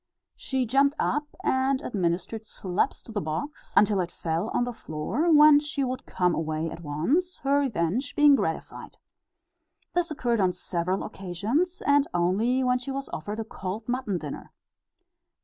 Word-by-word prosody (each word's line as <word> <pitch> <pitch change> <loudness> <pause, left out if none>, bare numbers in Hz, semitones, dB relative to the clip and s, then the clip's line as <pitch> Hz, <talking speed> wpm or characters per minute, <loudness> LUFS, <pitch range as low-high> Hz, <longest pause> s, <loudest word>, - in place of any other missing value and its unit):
She 265 -1 -1
jumped 275 +4 +3
up 295 0 0 0.2
and 260 +1 +2
administered 190 +2 -2
slaps 185 -3 -2
to - - -11
the 210 -2 -2
box, 160 - -5
until 205 -1 +5
it 175 -2 -1
fell 170 +5 -2
on - - +1
the 245 0 -3
floor, 225 - -1
when 300 -1 +8
she 295 -1 -2
would 255 -1 -4
come 180 -1 +1
away 160 0 -2
at 170 - -8
once, 250 - 0
her 280 +1 +3
revenge 250 - -1
being 295 -1 +7
gratified. - - -4 1.0
This 350 -1 +1
occurred 240 -6 0
on 185 -1 +2
several 180 +1 -2
occasions, 225 - -2
and 285 0 +4
only 215 +9 +2
when 250 0 +2
she 250 - -7
was 275 0 -4
offered 205 +8 -4
a - - -1
cold 210 0 -6
mutton 245 -6 -1
dinner. 150 -4 -7
230 Hz, 160 wpm, -27 LUFS, 180-275 Hz, 1.0 s, when